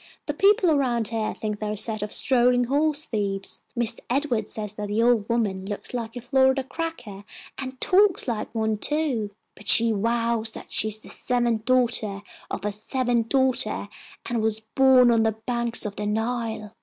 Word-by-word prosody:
The 295 - -2
people 395 +1 +4
around 245 -7 +1
here 220 -1 -2
think 210 -1 -4
they 215 - -3
are 210 - -2
a - - -5
set 215 0 0
of 210 0 -4
strolling 245 -1 +3
horse 295 +4 0
thieves. 200 -3 -2
Mister 235 -1 -1
Edward 245 -5 0
says 210 -2 -5
that 210 -1 -5
the 210 +3 0
old 235 -3 +2
woman 210 -5 0
looks 205 +4 -6
like 230 -1 -4
a 245 - -6
Florida 265 +1 +2
cracker, 260 - -6 0.4
and 260 -1 -6
talks 390 -3 +3
like 225 -3 -2
one 220 -1 0
too, 285 -9 -1 0.2
but 205 - -15
she 230 +1 +5
vows 230 +1 0
that - - -11
she 215 - +4
is 215 0 0
the 215 - -14
seventh 240 -3 -1
daughter 235 -5 +1 0.3
of 205 - -5
a 210 - 0
seventh 235 +2 -1
daughter 255 -6 +1 0.4
and 235 -2 -1
was 220 0 0
born 255 +2 +5
on 230 -1 +3
the 220 0 +2
banks 235 -2 0
of 205 -1 -5
the 210 - -3
Nile." 225 -1 -2
230 Hz, 185 wpm, -24 LUFS, 215-255 Hz, 0.4 s, she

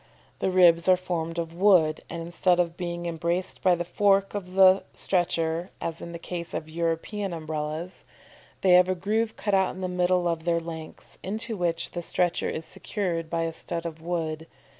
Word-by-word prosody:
The - - +1
ribs 175 -1 +5
are 185 - +8
formed 170 -2 -3
of 165 -1 -3
wood; 175 -4 +4
and 170 0 -5
instead 175 +1 +1
of 170 -1 +1
being 175 -1 -4
embraced 170 +2 -1
by 185 -2 +4
the 175 0 -3
fork 195 +1 +2
of 185 -3 -5
the 190 0 +7
stretcher, 170 -1 0
as 165 0 -1
in 170 - -7
the 170 - -6
case 170 0 -6
of 155 - -4
European 170 +4 -2
Umbrellas, 155 +2 -5 0.6
they 190 - +4
have 180 +1 +6
a 185 - +1
groove 215 +5 -1
cut 205 - -2
out 190 -1 +2
in 190 - -8
the 185 - -1
middle 180 0 +1
of 165 -1 -1
their 170 0 +1
lengths, 165 -1 -9
into 220 +4 -3
which 170 -3 -1
the 175 - -4
stretcher 175 0 0
is 160 - -4
secured 170 -6 -3
by 165 0 -1
a 165 0 -2
stud 170 +1 -3
of 160 -1 -6
wood. 160 -2 -3
175 Hz, 190 wpm, -26 LUFS, 165-185 Hz, 0.6 s, are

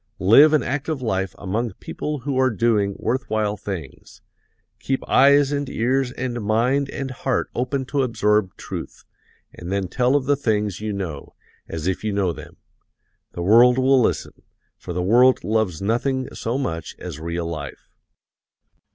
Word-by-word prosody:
Live 135 +11 +6
an 155 - +3
active 145 +2 -2
life 95 -6 -2
among 105 +3 -3
people 150 +7 -5
who 140 +2 -3
are 130 0 +4
doing 105 -4 +1
worth 130 +2 -2
while 105 -1 0
things, 95 -9 -8 0.6
keep 135 0 -3
eyes 140 +1 +5
and 145 -2 -2
ears 130 +2 0
and 120 -2 -4
mind 125 +6 +1
and 135 -1 -5
heart 130 0 -2
open 130 +2 -2
to 140 +2 -1
absorb 105 -5 +1
truth, - - -8 0.5
and 85 +2 -8
then 100 -1 -1
tell 125 +7 +1
of 140 -3 +1
the 145 +1 +3
things 105 -7 -1
you 110 0 -3
know, 90 -8 -6 0.3
as 80 -1 -5
if 95 +2 -1
you 110 - -1
know 100 -4 0
them. - - -12 0.8
The 85 - -4
world 120 +6 +6
will 130 0 +4
listen, - - -2 0.3
for 90 - -9
the 90 +1 -2
world 125 +6 +4
loves 105 -6 -1
nothing 130 +5 0
so 115 +3 -3
much 85 - -4
as 85 -5 -7
real 85 +1 -3
life. 80 -4 -7
115 Hz, 160 wpm, -22 LUFS, 95-130 Hz, 0.8 s, Live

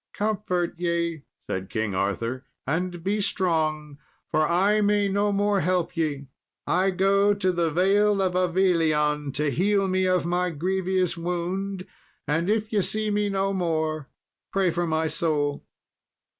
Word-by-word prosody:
"Comfort 205 -5 -1
ye," 170 -2 -1 0.2
said 95 0 -4
King 110 -3 -2
Arthur, 115 +7 -2 0.2
"and 175 +4 -2
be 205 +3 0
strong, 155 -6 -1 0.3
for 155 -1 +2
I 200 +5 +3
may 205 0 +2
no 200 +1 +1
more 205 0 +1
help 180 0 0
ye. 150 -4 -1 0.4
I 185 +2 +2
go 195 +2 +3
to 185 -2 +1
the 170 -2 0
Vale 195 +5 +3
of 185 -2 +1
Avilion 165 -5 +1
to 150 -1 0
heal 195 +6 +2
me 185 0 +1
of 185 -2 +2
my 180 +1 0
grievous 185 +2 -1
wound, 180 +3 -3 0.4
and 165 +5 0
if 215 0 0
ye 205 - +3
see 215 +2 -1
me 205 0 +1
no 195 0 0
more, 160 -5 -1 0.4
pray 190 -3 +2
for 170 +1 -1
my 160 0 0
soul." 150 -2 -1
180 Hz, 145 wpm, -25 LUFS, 160-195 Hz, 0.4 s, I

